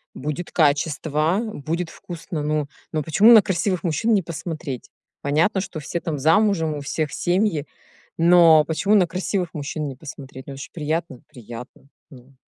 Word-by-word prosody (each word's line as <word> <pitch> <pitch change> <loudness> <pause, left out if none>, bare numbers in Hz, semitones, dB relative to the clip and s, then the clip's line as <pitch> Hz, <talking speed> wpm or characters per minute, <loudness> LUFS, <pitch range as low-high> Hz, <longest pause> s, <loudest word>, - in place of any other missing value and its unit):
Будет 150 +5 -5
качество, 155 +2 +1
будет 165 +4 -3
вкусно. 165 -2 -7
Ну, 150 0 -1 0.2
но 155 -2 -1
почему 195 +10 +5
на 220 - +9
красивых 185 -1 -1
мужчин 180 +7 +1
не 200 - +3
посмотреть? 160 -5 -6 0.3
Понятно, 160 +8 +1
что 165 - -6
все 155 +3 -4
там 160 -3 -3
замужем, 165 +1 +2
у 145 - -5
всех 150 +1 -2
семьи, 175 -4 0 0.5
но 165 -2 +7
почему 165 +7 +1
на 185 -4 +4
красивых 180 0 -2
мужчин 150 +1 -4
не 135 - -6
посмотреть? 135 -2 -10
Ну, 140 - -6
это 135 - -9
же - - -8
приятно? 155 -4 -3
Приятно. 120 +3 -11 0.2
Ну, 135 -2 -16
160 Hz, 160 wpm, -22 LUFS, 145-175 Hz, 0.5 s, на